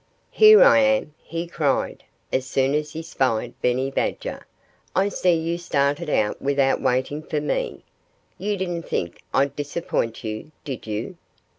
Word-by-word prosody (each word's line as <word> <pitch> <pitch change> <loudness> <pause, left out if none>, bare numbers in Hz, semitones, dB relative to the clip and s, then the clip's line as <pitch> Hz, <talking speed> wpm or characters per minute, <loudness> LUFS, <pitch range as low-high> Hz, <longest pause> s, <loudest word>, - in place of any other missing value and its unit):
"Here 435 +2 +8
I - - +7
am!" 270 - +2
he 165 +1 -4
cried, 155 -5 -1 0.3
as 130 0 0
soon 135 +1 +1
as 150 0 -1
he 160 +1 -5
spied 130 -8 -1
Benny 130 +2 +1
Badger. - - -3 0.5
"I 195 +2 +3
see 180 -3 +2
you 165 +1 -2
started 145 0 0
out 105 -7 0
without 140 -1 +2
waiting 130 +4 0
for 155 -1 -2
me. 475 - -2 0.6
You 205 0 -1
didn't 175 -3 -3
think 85 0 -3
I'd 140 0 +1
disappoint 145 -6 -2
you, 110 +5 -5 0.2
did 130 -5 -6
you?" 110 - -4
150 Hz, 150 wpm, -23 LUFS, 130-175 Hz, 0.6 s, Here